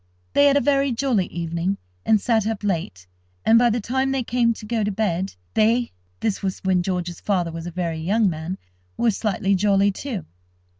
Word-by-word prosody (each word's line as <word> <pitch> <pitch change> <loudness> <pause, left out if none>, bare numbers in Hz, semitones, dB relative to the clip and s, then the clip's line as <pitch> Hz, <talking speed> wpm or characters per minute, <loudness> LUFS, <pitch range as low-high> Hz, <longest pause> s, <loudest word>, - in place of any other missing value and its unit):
They 285 - +5
had 280 0 +4
a - - +3
very 275 -1 +2
jolly 235 -6 +1
evening, 170 +3 -2 0.3
and 215 - +5
sat 220 -1 +1
up 220 -2 -3
late, 160 - -2 0.4
and, 230 +1 +6
by 240 0 +4
the 235 +1 0
time 265 +5 0
they 270 -1 0
came 235 0 +2
to 225 -1 -6
go 220 0 -1
to 205 - 0
bed, 190 - -1 0.2
they 230 +3 +2 0.3
(this 215 -3 -1
was 190 -2 -2
when 185 -1 +2
George's 175 -2 -3
father 180 -5 0
was 165 +1 -6
a - - -5
very 170 -2 -2
young 205 +7 +2
man) 170 +2 -3 0.4
were 235 - +3
slightly 205 -1 0
jolly, 200 +1 +3
too. 210 - -5
205 Hz, 195 wpm, -23 LUFS, 180-230 Hz, 0.4 s, and